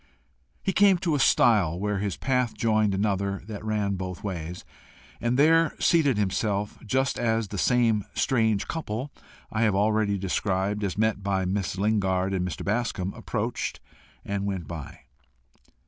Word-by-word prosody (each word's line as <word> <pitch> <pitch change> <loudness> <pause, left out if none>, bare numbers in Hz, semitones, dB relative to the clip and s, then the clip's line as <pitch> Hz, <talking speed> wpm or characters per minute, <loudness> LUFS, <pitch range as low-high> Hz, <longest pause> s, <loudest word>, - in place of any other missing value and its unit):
He 195 - 0
came 195 -1 +5
to 170 -2 -1
a 145 - +1
stile 95 -10 +4
where 105 0 -1
his 100 -2 -2
path 125 -3 0
joined 110 -3 +2
another 100 -1 -1
that 105 -1 -7
ran 105 -2 -1
both 90 -1 -6
ways, 90 -3 -5 0.6
and 120 +1 +1
there 165 +3 +4
seated 145 - +3
himself, 105 +1 -1
just 130 +4 0
as 115 -3 0
the 100 - -4
same 115 -3 +2
strange 110 -5 +1
couple 140 -4 -4 0.4
I 110 - -1
have 105 -4 +3
already 105 0 +2
described 95 +2 -1
as 100 -2 -2
met 110 -1 +1
by 95 -1 0
Miss 95 0 -2
Lingard 95 -2 +1
and 95 -2 0
Mr. - - -6
Bascombe 105 -3 -1
approached - - -3 0.5
and 100 0 -2
went 95 -5 -3
by. 75 -3 -8
105 Hz, 150 wpm, -26 LUFS, 95-115 Hz, 0.6 s, came